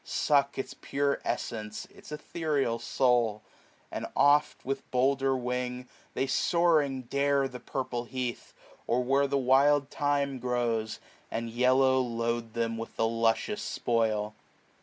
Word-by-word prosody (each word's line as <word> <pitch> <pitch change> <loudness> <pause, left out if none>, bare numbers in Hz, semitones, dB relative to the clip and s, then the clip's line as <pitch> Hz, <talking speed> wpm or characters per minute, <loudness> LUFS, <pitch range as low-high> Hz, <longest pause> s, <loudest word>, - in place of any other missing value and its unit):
Suck 140 -2 +1
its 135 - -4
pure 140 0 -1
essence^ 110 -1 -4
its - - -15
ethereal 150 -6 -1
soul; 120 -3 +1 0.5
And - - -4
oft, 145 +1 +3
with 135 +1 -4
bolder 135 +1 +2
wing, 125 0 -3 0.3
they 135 - +1
soaring 150 -2 +2
dare 140 +3 +1
510 135 - -3
The 125 - -7
purple 125 -3 -3
heath, 125 -1 -4 0.3
or 125 +2 +2
where 135 +2 +2
the 140 - 0
wild 140 +2 +4
thyme 140 -2 0
grows. 120 -3 -1 0.3
And 115 0 -3
yellow 130 +2 +4
load 115 -2 -2
them 115 -1 -1
with 115 - -7
the 115 - +1
luscious 115 - 0
spoil. 110 - 0
125 Hz, 135 wpm, -29 LUFS, 115-140 Hz, 0.5 s, wild